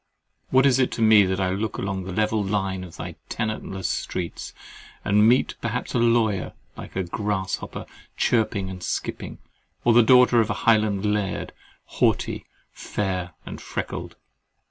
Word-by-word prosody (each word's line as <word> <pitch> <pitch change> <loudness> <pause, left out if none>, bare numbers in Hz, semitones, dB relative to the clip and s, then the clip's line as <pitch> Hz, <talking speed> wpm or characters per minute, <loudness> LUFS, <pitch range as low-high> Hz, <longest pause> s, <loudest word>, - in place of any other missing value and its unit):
What 130 +1 +4
is 135 -2 +4
it 130 - +2
to - - -4
me 110 -2 +7
that 95 +1 -1
I 95 -1 +1
look 100 +2 -2
along 95 -1 -3
the 95 - -5
level 105 +2 +1
line 95 -2 -1
of 90 -3 -11
thy - - -7
tenantless 110 -4 -3
streets, 85 -2 -4 0.5
and 105 +2 +5
meet 125 +2 +3
perhaps 115 +2 -3
a 125 - +2
lawyer 115 -5 +2 0.2
like - - -10
a 95 - 0
grasshopper 95 +1 -3 0.3
chirping 110 -4 +1
and 95 -1 -7
skipping, - - -4 0.5
or 120 - +5
the 120 - +7
daughter 125 0 +6
of 110 - -1
a - - +1
Highland 110 -3 +3
laird, 105 -2 -1 0.3
haughty, - - 0 0.2
fair, 90 -4 -3
and - - -8
freckled? - - -5
105 Hz, 155 wpm, -24 LUFS, 95-115 Hz, 0.5 s, me